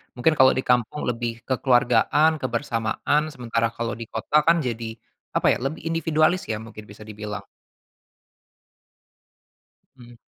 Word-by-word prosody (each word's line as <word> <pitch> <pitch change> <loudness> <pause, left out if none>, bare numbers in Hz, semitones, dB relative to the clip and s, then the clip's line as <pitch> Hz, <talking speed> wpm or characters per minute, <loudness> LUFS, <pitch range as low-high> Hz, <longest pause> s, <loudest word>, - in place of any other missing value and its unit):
Mungkin 125 +6 +2
kalau 130 -1 +6
di 130 - -1
kampung 125 +3 0
lebih 115 -1 -4
kekeluargaan, 130 +4 +3
kebersamaan, 115 +3 -1
sementara 115 -3 -1
kalau 115 0 -3
di 115 -2 -7
kota 115 +6 -4
kan 170 +1 +6
jadi 115 -2 -4 0.4
apa - - +1
ya, - - +1
lebih 155 +4 -4
individualis 165 +1 +2
ya, 105 - -2
mungkin 110 -1 -11
bisa 105 +1 -12
dibilang? 105 -1 -7 2.5
Mhm. 120 -2 -15
120 Hz, 130 wpm, -24 LUFS, 115-140 Hz, 2.5 s, kalau